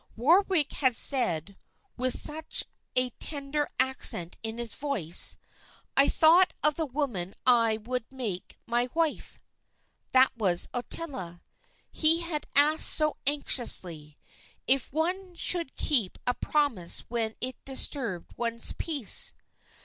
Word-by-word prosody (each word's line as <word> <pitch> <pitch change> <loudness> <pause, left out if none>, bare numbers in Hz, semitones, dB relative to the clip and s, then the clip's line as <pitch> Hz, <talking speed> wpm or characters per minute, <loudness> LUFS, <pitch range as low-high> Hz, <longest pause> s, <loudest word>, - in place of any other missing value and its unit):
Warwick 330 - +2
had 260 -4 0
said, 195 - +2 0.4
with 255 0 +1
such 315 +1 +1 0.3
a 255 0 +1
tender 290 0 -3
accent 180 -9 -1
in 225 0 -5
his 235 -2 -4
voice, 225 - 0 0.6
"I 275 - +4
thought 345 +4 +4
of 300 +1 +4
the 320 +1 -3
woman 245 -10 -4
I 230 -3 +3
would 240 +2 -6
make 225 -9 -6
my 240 +1 -1
wife." 330 -2 -2 0.7
That 260 0 +4
was 190 -7 +2
Ottila. 245 - -5 0.5
He 325 +2 +3
had 335 -3 -3
asked 300 +3 +5
so 305 -1 +1
anxiously, 180 - +1 0.5
"If 265 0 0
one 355 +5 -3
should 335 -4 0
keep 235 -11 +2
a 245 - +1
promise 245 - -1
when 225 -2 -4
it 255 0 -6
disturbed 260 - -2
one's 230 -1 0
peace?" 290 - +3
260 Hz, 120 wpm, -27 LUFS, 225-300 Hz, 0.7 s, asked